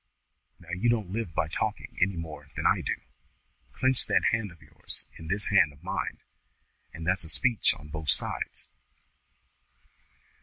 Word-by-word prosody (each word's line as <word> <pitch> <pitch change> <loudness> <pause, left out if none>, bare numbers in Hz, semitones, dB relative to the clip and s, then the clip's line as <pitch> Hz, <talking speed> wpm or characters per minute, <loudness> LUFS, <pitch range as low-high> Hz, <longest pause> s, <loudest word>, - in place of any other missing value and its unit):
Now 85 - -16
you 115 +7 +1
don't 110 -6 0
live 105 -6 -4
by 80 - +1
talking 105 +6 -3
any 95 +1 +3
more 75 -4 -7
than - - -4
I - - +4
do. - - -1 0.8
Clench 130 - +1
that - - +3
hand 115 -4 -1
of 85 - -17
yours 75 -3 -2
in 80 - -9
this 100 +4 +1
hand 85 -7 +5
of 70 - -20
mine, - - -3 0.7
and 80 - -8
that's 90 +1 +3
a 80 - -4
speech 120 +7 +4
on 75 +1 -13
both 75 -1 -5
sides." - - +2
90 Hz, 160 wpm, -28 LUFS, 80-105 Hz, 0.8 s, hand